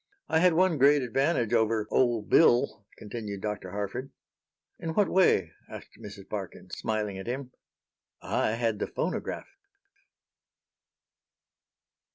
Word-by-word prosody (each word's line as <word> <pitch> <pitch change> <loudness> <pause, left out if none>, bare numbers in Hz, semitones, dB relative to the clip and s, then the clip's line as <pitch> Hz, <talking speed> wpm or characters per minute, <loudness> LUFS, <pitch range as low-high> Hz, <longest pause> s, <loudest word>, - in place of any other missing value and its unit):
"I 160 - +2
had 180 0 +5
one 175 -2 +2
great 140 +1 +5
advantage 130 -1 0
over 110 -1 +2
'old 120 -4 +2
Bill,'" 120 -8 +3
continued 105 -2 -6
Dr. 105 -1 -4
Harford. 105 +7 -4 0.7
"In 160 -1 -4
what 205 -3 +3
way?" 100 - +3 0.2
asked - - -11
Mrs. - - -10
Parkin, - - -7
smiling 105 -3 -3
at 95 - -8
him. 130 +1 -4 0.7
"I 110 - 0
had 115 -2 -1
the - - -1
phonograph." - - -3
120 Hz, 120 wpm, -28 LUFS, 105-145 Hz, 0.7 s, had